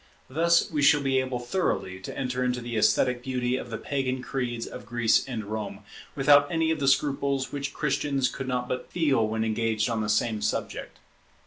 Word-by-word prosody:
Thus 170 +4 +3
we 150 -2 0
shall 145 +1 +5
be 135 -1 +2
able 130 -1 -2
thoroughly 120 - -2
to 95 - -8
enter 125 -1 -1
into 125 0 0
the 120 -1 -5
esthetic 120 +3 +2
beauty 125 -1 -1
of 125 - -5
the 115 - -4
Pagan 130 -1 -2
creeds 120 -4 -3
of - - -8
Greece 120 0 +2
and 115 -5 -4
Rome, 105 -1 -5 0.3
without 145 0 +5
any 165 -1 +1
of 160 - -1
the 140 - 0
scruples 140 -1 +1
which 140 -1 -3
Christians 140 -2 0
could 130 +1 -5
not 125 -1 -1
but 125 - -4
feel 140 -10 +2
when 110 +1 -1
engaged 110 0 0
on 115 -1 -1
the 105 - -2
same 110 0 +1
subject. 105 - -3
125 Hz, 195 wpm, -27 LUFS, 115-140 Hz, 0.3 s, shall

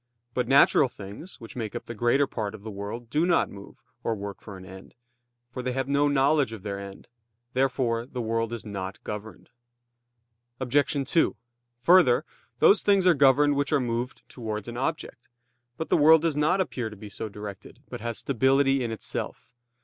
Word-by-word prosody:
But 125 - -1
natural 135 -1 +5
things 105 - -10
which 115 - -11
make 115 -2 -5
up 120 - -5
the 120 - -6
greater 120 +5 +2
part 110 -5 -4
of 100 - -13
the 110 - -6
world 105 +4 -7
do 150 +4 +2
not 175 0 +2
move, 100 0 -13 0.2
or 115 - 0
work 100 -1 -7
for 100 -3 -9
an 95 - -11
end; 95 +3 -12 0.6
for 125 - -5
they 125 0 -2
have 135 0 -2
no 140 +1 +2
knowledge 140 -2 +2
of 105 -4 -9
their 100 -2 -4
end. 100 0 -10 0.5
Therefore 125 -3 0
the 130 - -6
world 115 0 -1
is 120 -1 -5
not 95 -2 -5
governed. 105 +1 -8 1.1
Obj. 135 +2 +1
2: 165 - +2 0.5
Further, 155 -3 +5 0.3
those 205 - +6
things 200 -2 +3
are 180 - +7
governed 145 0 +4
which 140 +2 -1
are 150 - +3
moved 120 0 -3
towards 110 -4 -5
an 120 - -6
object. 135 -2 -4 0.5
But 160 - -4
the - - +4
world 160 +1 +6
does 165 -3 +1
not 150 +6 +2
appear 125 -11 -2
to 105 - -11
be 105 +1 -10
so 105 +2 -6
directed, 105 -1 -9
but - - -7
has 115 -1 -3
stability 135 +1 +2
in 120 - -2
itself. 110 +2 -6
120 Hz, 190 wpm, -26 LUFS, 110-140 Hz, 1.1 s, are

